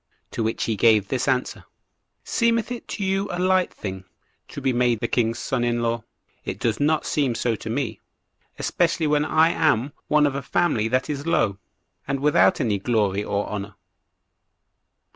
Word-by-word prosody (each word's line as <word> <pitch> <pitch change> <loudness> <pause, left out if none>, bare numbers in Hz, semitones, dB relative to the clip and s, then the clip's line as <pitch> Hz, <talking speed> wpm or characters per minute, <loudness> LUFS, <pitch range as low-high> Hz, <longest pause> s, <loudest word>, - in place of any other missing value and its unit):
To - - -3
which 110 0 -1
he 110 - -1
gave 105 -1 +4
this 130 0 -1
answer:"Seemeth 230 - -2
it 245 - -6
to 205 - -4
you 195 +1 0
a - - -3
light 185 0 +2
thing 95 -2 -7 0.4
to - - -8
be 135 -2 0
made 120 -2 +2
the 120 - -1
king's 115 -1 0
son 120 0 -2
in 120 0 0
law? 115 -1 -1 0.4
It - - -4
does 115 -2 0
not 155 +2 +1
seem 135 -6 0
so 120 -1 0
to 110 - -7
me, 115 -3 -2 0.6
especially 160 - 0
when 150 0 +2
I 160 +1 +4
am 145 -4 +1
one 150 0 +4
of 145 - +1
a 140 - -3
family 135 -7 +1
that 130 +2 0
is 145 +1 -4
low, 100 - +1 0.5
and 135 0 -1
without 135 -10 +4
any 105 -4 0
glory 105 -2 0
or 100 0 -2
honor." 100 -1 -5
125 Hz, 175 wpm, -23 LUFS, 110-150 Hz, 0.6 s, gave